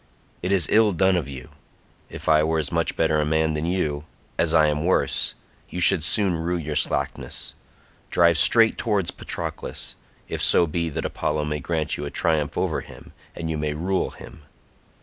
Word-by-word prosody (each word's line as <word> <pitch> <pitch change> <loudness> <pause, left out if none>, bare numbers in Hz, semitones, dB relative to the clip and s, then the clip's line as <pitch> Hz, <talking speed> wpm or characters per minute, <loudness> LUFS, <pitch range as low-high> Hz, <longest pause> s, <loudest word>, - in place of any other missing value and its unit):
It 90 - -2
is 95 -5 +3
ill 110 -2 +4
done 95 +2 +2
of 85 -6 -2
you. 65 -3 -9 0.6
If - - -9
I 75 -1 +4
were 80 +1 0
as 80 - -2
much - - -1
better 75 -1 +1
a - - +1
man 80 +1 +1
than 75 +2 -3
you, 75 -5 -2 0.3
as - - +2
I 80 - +5
am 75 0 0
worse, 90 +2 +1 0.3
you 90 - -5
should 85 -2 +6
soon 95 +3 +3
rue 85 +2 -1
your 75 -2 -5
slackness. - - -2 0.6
Drive 85 -2 +3
straight 115 +7 +5
towards 105 -7 0
Patroclus, - - -5 0.3
if - - -4
so 85 - +5
be 85 +1 -2
that 75 - -4
Apollo 75 -1 -2
may 75 0 -3
grant 80 +1 -2
you 75 - -5
a - - -4
triumph 80 -1 -1
over - - -1
him, - - -14 0.2
and 85 - -5
you 80 - -3
may 75 0 -2
rule 90 +4 -1
him." - - -13
80 Hz, 190 wpm, -23 LUFS, 75-90 Hz, 0.6 s, should